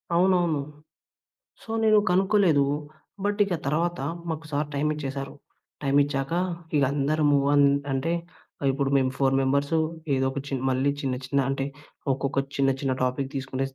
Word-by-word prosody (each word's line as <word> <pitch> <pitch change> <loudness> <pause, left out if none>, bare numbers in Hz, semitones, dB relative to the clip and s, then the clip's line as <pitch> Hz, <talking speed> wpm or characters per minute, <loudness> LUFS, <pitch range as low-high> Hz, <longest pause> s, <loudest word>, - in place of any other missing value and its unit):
అవునవును. 175 -4 +3 1.0
సో - - -12
నేను 215 -1 +5
కనుక్కోలేదు. 185 -5 +4 0.6
బట్ 205 +1 0
ఇక 195 -3 -2
తర్వాత 170 +5 0 0.3
మాకు 160 0 -4
సార్ 145 +1 0
టైం 145 +2 +1
ఇచ్చేసారు. 135 -2 -5 0.5
టైం 140 -1 +1
ఇచ్చాక 140 +1 -2 0.4
ఇక 145 - +4
అందరము 145 0 +2 0.2
అం 145 - +6 0.3
అంటే 135 +6 0 0.5
ఆహ్, 135 - +2
ఇప్పుడు 135 0 -1
మేము 130 -1 +2
4 135 -1 +2
మెంబర్స్ 140 +3 +1 0.4
ఏదో 130 0 +1
ఒక 140 - -4
చిన్ 135 -2 -2
మళ్ళీ 130 +2 +2
చిన్న, 135 -3 -1
చిన్న 140 +2 +1
అంటే 135 0 -1 0.5
ఒక్కొక్క 135 +1 -2 0.2
చిన్న, 135 -1 +3
చిన్న 135 -2 0
టాపిక్ 130 +2 0
తీసుకునేసి 135 0 -3
140 Hz, 150 wpm, -26 LUFS, 135-160 Hz, 1.0 s, అం